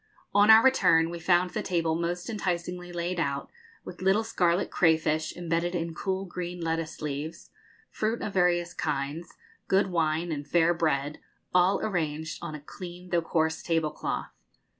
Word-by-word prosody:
On 205 +1 +5
our 220 +1 +9
return 165 -11 +4
we 170 - -5
found 175 +1 +2
the - - -2
table 165 -3 0
most 175 +2 -2
enticingly 180 -4 -3
laid 175 +1 -2
out, 140 -3 -2 0.3
with 180 0 -9
little 195 +4 +3
scarlet 180 -5 +1
crayfish, 160 -2 +2
embedded 175 +1 -1
in 165 -1 -2
cool 190 +3 -2
green 180 -1 -5
lettuce 165 -1 -3
leaves, 150 +2 -5 0.4
fruit 220 +2 -1
of 205 - -4
various 175 -1 +2
kinds, 150 +1 -3 0.3
good 190 0 +2
wine 165 0 0
and 145 -2 -4
fair 170 +2 +3
bread, 150 -3 -1 0.3
all 180 +2 +4
arranged 160 -5 -2
on 170 -3 -5
a - - -7
clean 180 +4 -10
though 170 -1 +3
coarse 160 -1 0
tablecloth. 165 -3 -2
170 Hz, 155 wpm, -28 LUFS, 160-180 Hz, 0.4 s, our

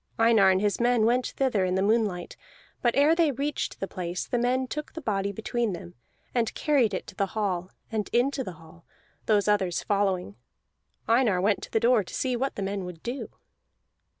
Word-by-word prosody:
Einar 225 -4 +5
and 190 0 +3
his 205 -1 0
men 240 -2 +3
went 245 +2 +2
thither 250 -8 0
in 185 0 0
the 190 - +1
moonlight, 205 -5 0 0.5
but 240 -1 +2
ere 290 +3 +5
they 330 -2 +3
reached 280 +3 -3
the 195 - -3
place 180 -1 -4
the 245 - -1
men 255 +2 +1
took 300 +4 -6
the - - -6
body 200 -5 -1
between 220 +1 -2
them, 85 - -8 0.4
and 235 -3 0
carried 275 -8 +2
it - - -4
to - - -11
the 195 - 0
hall, 185 -4 -1 0.2
and 215 -2 -2
into 265 +3 +1
the 185 - -6
hall, 165 +1 -17 0.4
those 210 -2 +3
others 190 -4 +1
following. 190 - 0 0.7
Einar 230 -5 +3
went 200 +2 +1
to - - -8
the 225 - +2
door 235 -1 +4
to - - -9
see 255 -2 0
what 270 +3 -2
the 200 - -3
men 195 0 -2
would 180 -2 -9
do. 245 +3 -4
215 Hz, 200 wpm, -27 LUFS, 190-245 Hz, 0.7 s, Einar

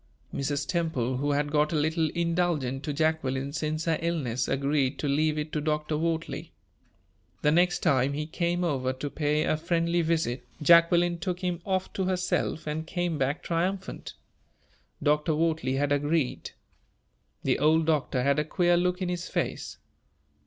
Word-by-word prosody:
Mrs. 140 +1 -2
Temple, 150 -8 -1
who 145 +2 0
had 145 0 0
got 150 0 +2
a - - -1
little 160 +1 +1
indulgent 170 -6 0
to 150 - -1
Jacqueline 140 -3 0
since 155 0 -2
her 165 -1 +1
illness, 135 -8 -1
agreed 140 0 0
to 150 - -2
leave 155 +2 +1
it 150 0 -3
to 150 - 0
Dr. 150 0 -1
Wortley. 165 +1 -2 0.9
The 150 - +4
next 175 +2 +2
time 140 -4 +3
he 150 +1 -2
came 170 +2 -1
over 130 -6 0
to 145 +2 -5
pay 150 0 +1
a - - +1
friendly 170 +1 +1
visit, 160 -7 0 0.2
Jacqueline 170 +2 +5
took 180 +1 -3
him 180 -2 -2
off 190 -1 -1
to 190 - -1
herself, 180 -3 -1
and 155 +1 -3
came 175 -3 -2
back 135 +3 -1
triumphant. 185 +3 -2 0.9
Dr. 150 +1 +2
Wortley 155 -5 0
had 145 +1 0
agreed. 145 -1 0 0.9
The - - +1
old 155 +2 +4
doctor 145 -5 +1
had 140 +2 +2
a - - +2
queer 175 +3 +2
look 180 +1 0
in 180 - -1
his 180 0 -3
face. - - -3
155 Hz, 160 wpm, -27 LUFS, 145-170 Hz, 0.9 s, Jacqueline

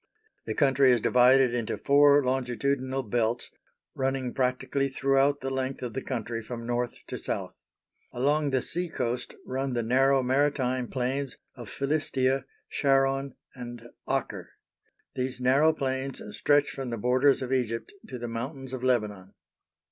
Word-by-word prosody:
The - - -2
country 135 -2 +4
is 120 - +4
divided 125 +2 +5
into 120 -3 -2
four 145 0 +5
longitudinal 130 +1 -1
belts 115 +1 -1 0.4
running 135 -2 -1
practically 130 +2 0
throughout 135 +1 +2
the 135 - -3
length 130 0 -3
of 120 -2 -4
the 135 - -3
country 115 -3 -4
from 115 +1 -7
North 120 0 -1
to - - -6
South. - - -4 0.6
Along 145 +4 +1
the 130 -2 0
sea 175 +1 -3
coast 125 -4 -3
run 130 +1 -2
the 120 -1 0
narrow 135 +3 +3
maritime 130 -1 +1
plains 130 +2 -2 0.2
of 120 -5 -10
Philistia, 135 -2 0 0.2
Sharon, 135 -1 +1 0.2
and 120 -2 -9 0.2
Acre. - - -2 0.6
These 130 -1 -3
narrow 135 +5 +4
plains 130 -2 -3 0.2
stretch 145 0 +3
from 135 -2 -5
the 115 - -3
borders 130 +5 +3
of 130 +1 -2
Egypt 115 -3 -2
to 130 - -6
the 120 0 -5
mountains 130 +3 -5
of 130 -1 -5
Lebanon. 105 -7 -1
130 Hz, 145 wpm, -28 LUFS, 125-135 Hz, 0.6 s, divided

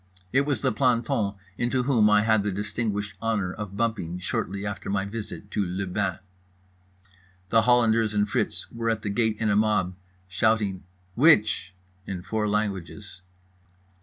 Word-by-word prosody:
It 140 +2 +3
was 135 -7 -1
the - - +3
planton 115 -4 +1 0.2
into 125 +1 +1
whom 120 -5 +4
I 105 0 +5
had 110 - +1
had 110 -2 +4
the 105 - -1
distinguished 105 +1 -3
honour 105 -5 -1
of 100 -2 -7
bumping 105 -7 -1
shortly 95 +2 -3
after 100 -2 -5
my 100 0 0
visit 105 -1 -7
to 105 - 0
le 95 +2 -3
bain. 95 -1 -1 1.3
The 115 +2 +5
Hollanders 115 -2 +3
and 105 0 +2
Fritz - - 0
were 115 0 -2
at 110 -1 -1
the 100 - -2
gate 110 0 +1
in 110 -2 +1
a - - +2
mob, 105 -3 +2
all - - -23 0.3
shouting 100 0 +1 0.3
"Which" 110 - +3 0.3
in 90 -2 -5
four 105 +2 -1
languages. 100 -2 -3
105 Hz, 165 wpm, -26 LUFS, 100-115 Hz, 1.3 s, I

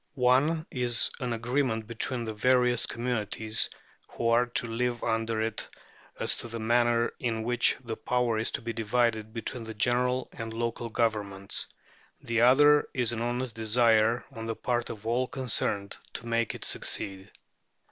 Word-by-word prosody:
One 140 +6 +3
is 120 -2 +1
an 125 -2 -2
agreement 115 0 0
between 120 +2 -2
the 110 -1 -4
various 125 +2 +3
communities 110 -2 -1 0.4
who 115 - -2
are 120 +1 +4
to 120 - 0
live 120 +1 -2
under 115 -1 0
it 110 -1 -3 0.5
as - - +2
to - - -5
the 115 0 -6
manner 120 +1 +2
in 115 -3 -1
which 120 +1 +3
the 115 -2 -4
power 120 -2 0
is 110 - 0
to - - -3
be 115 0 -3
divided 110 -1 0
between 115 +1 -4
the 110 0 -8
general 125 +4 +1
and 115 -1 -6
local 115 0 -2
governments; 105 -4 -1 0.5
the 115 -1 0
other 145 +4 +6
is 120 -3 +1
an 115 -1 -3
honest 120 0 -2
desire 115 +1 +3
on 115 -3 -7
the 115 - -2
part 120 0 -1
of 110 -1 -8
all 120 +3 +1
concerned 110 -7 -1 0.2
to 115 - -6
make 115 -1 0
it - - -7
succeed. 95 -1 -2
115 Hz, 160 wpm, -28 LUFS, 110-125 Hz, 0.5 s, other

